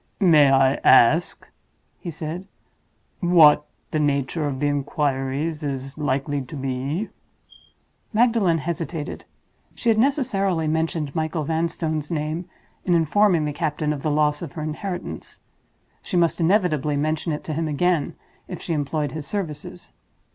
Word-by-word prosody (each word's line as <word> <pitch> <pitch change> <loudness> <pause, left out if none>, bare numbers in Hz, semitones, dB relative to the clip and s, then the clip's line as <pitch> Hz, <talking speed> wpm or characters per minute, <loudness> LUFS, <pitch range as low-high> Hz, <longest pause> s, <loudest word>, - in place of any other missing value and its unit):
"May 155 -8 +6
I 135 0 +4
ask," 155 +9 +4 0.5
he 175 - -6
said, 165 +4 -6 0.7
"what 160 -5 +6 0.2
the 155 - 0
nature 145 +1 0
of 135 -2 -3
the 145 - 0
inquiries 145 +2 -1
is 135 -1 -4
likely 145 -1 -1
to 145 +4 -9
be?" 135 +8 -3 1.0
Magdalen 225 -7 +3
hesitated. 160 -1 -4 0.5
She 235 - -1
had 220 -1 +3
necessarily 205 - +1
mentioned 160 -2 -1
Michael 160 0 -1
Vanstone's 160 -1 -2
name 155 +2 -2 0.4
in 175 - +2
informing 170 0 +3
the 150 - -2
captain 150 0 -1
of 145 - -6
the 155 - -1
loss 150 0 +1
of 165 -5 -7
her 160 -3 -5
inheritance. 175 +4 -6 0.6
She 180 - -2
must 170 0 +2
inevitably 160 -6 +2
mention 155 +3 -1
it 150 - -4
to 155 - -4
him 160 +1 -1
again 160 +1 0 0.3
if - - -6
she 170 - -3
employed 150 -1 -1
his 150 +1 -6
services. 150 - -5
155 Hz, 140 wpm, -23 LUFS, 145-170 Hz, 1.0 s, May